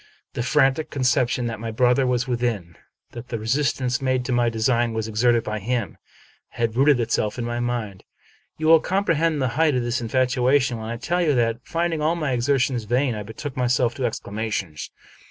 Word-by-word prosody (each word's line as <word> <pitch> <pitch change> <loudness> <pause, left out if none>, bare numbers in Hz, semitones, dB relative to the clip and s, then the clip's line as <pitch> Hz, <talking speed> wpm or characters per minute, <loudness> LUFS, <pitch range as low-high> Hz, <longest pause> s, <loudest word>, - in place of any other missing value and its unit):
The - - -3
frantic 135 +3 +2
conception 125 -2 +1
that 115 -2 -4
my 115 0 -4
brother 125 +3 +2
was 125 0 0
within, 115 -9 -2 0.4
that 120 +1 -9
the 115 - -3
re 110 - -8
sistance 130 0 0
made 130 -1 0
to 130 - -3
my 120 -1 +2
design 115 +1 +1
was 110 -1 -2
exerted 115 +2 +2
by 110 0 -3
him, 115 0 -2 0.5
had 115 -1 -2
rooted 135 +1 +4
itself 115 -2 -1
in 120 - -3
my 120 0 -3
mind. 120 -6 -3 0.5
You 155 - -3
will 165 0 +7
comprehend 165 -4 0
the 130 - +1
height 160 -4 +3
of 125 - 0
this 120 0 -1
infatuation, 125 +1 +1
when 110 0 -6
I 115 - -4
tell 175 +9 -1
you 155 -5 +2
that, 115 -1 +1
finding 165 0 -1
all 160 +3 +1
my 155 -5 -2
exertions 125 -1 0
vain, 125 +3 +1
I 105 - -5
betook 110 +7 -7
myself 125 -1 +1
to 130 - -3
exclamations. 105 -7 -4
125 Hz, 190 wpm, -23 LUFS, 115-135 Hz, 0.5 s, will